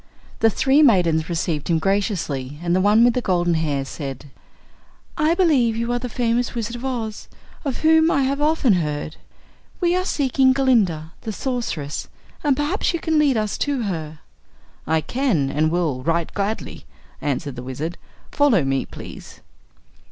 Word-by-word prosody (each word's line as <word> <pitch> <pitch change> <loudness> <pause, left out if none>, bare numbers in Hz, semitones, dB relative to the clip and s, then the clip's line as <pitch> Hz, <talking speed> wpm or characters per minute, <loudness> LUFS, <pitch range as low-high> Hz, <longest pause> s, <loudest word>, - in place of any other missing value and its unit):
The 225 - +5
three 270 +7 +3
maidens 175 - +3
received 165 -3 -2
him 170 - +2
graciously 160 - -1
and 175 0 +1
the 185 - +2
one 210 +4 +5
with 240 0 +5
the 250 - -1
golden 175 -4 +1
hair 150 -4 -1
said: 135 -1 -7 0.8
"I 315 +1 +2
believe 285 -11 +3
you 235 +1 -1
are 245 - 0
the 250 0 -5
famous 240 +1 0
Wizard 230 0 -3
of 240 - -10
Oz, 230 -5 -4 0.4
of 275 -5 -3
whom 320 0 +5
I 280 -4 +2
have 275 +2 -1
often 300 -6 +3
heard. 150 -3 -2 0.6
We 350 -1 +2
are 365 - +1
seeking 265 -6 +2
Glinda, 205 - +1
the 220 - -4
Sorceress, 215 - -3 0.4
and 285 -3 +2
perhaps 310 +5 0
you - - -2
can 320 -1 +1
lead 280 -5 +3
us 215 -1 -2
to 280 -4 0
her." 160 -6 -5 0.7
"I 160 0 +2
can, 195 - 0
and 155 +2 +1
will, 160 -6 -1
right 165 +4 -1
gladly," 205 +2 -3 0.4
answered 140 -1 -2
the 125 - -6
Wizard. 135 +7 -5 0.3
"Follow 275 - +3
me, 135 -1 -1
please." - - -11
210 Hz, 165 wpm, -22 LUFS, 160-265 Hz, 0.8 s, The